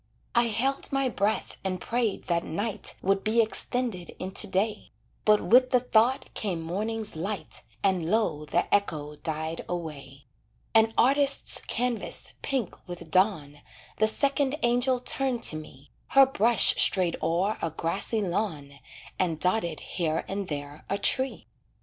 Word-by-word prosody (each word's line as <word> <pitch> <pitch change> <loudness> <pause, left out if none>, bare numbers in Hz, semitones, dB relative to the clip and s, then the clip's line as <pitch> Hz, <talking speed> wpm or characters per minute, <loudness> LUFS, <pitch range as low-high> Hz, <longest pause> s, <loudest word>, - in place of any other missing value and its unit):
I 235 0 +4
held 255 +5 -1
my 275 -1 +1
breath 210 -1 -1
and 185 -1 -2
prayed 235 -1 -1
that 170 -1 0
night 205 +5 -3
Would 195 +1 +1
be 225 +2 +1
extended 225 -3 +1
into 190 +3 -1
day, 205 +3 -1 0.4
But 210 -1 +5
with 255 +2 +5
the 250 -1 +4
thought 245 +1 +1
came 190 -6 -2
morning's 210 +6 -3
light, 195 +6 -4 0.2
And 185 -4 +1
low 175 -8 0
the - - 0
echo 155 -7 0
died 160 +1 -4
away. 145 -5 -6 0.5
An 225 0 +5
artist's 280 +2 +3
canvas, 245 -1 -2
pink 265 -8 -2
with 175 -1 -9
dawn, 160 -7 +1 0.4
The 215 - +3
second 280 +3 +1
angel 245 +2 +2
turned 250 -1 -1
to - - +3
me, 145 -3 -11 0.2
Her 275 0 +7
brush 235 -4 +4
strayed 180 -3 +2
o'er 185 +6 0
a 165 - -1
grassy 190 +7 -2
lawn 160 -8 -3 0.4
And 165 -4 0
dotted 175 -3 0
here 165 -3 -2
and 195 0 -4
there 145 -1 -6
a 200 - 0
tree. 260 +5 +2
200 Hz, 145 wpm, -27 LUFS, 165-235 Hz, 0.5 s, Her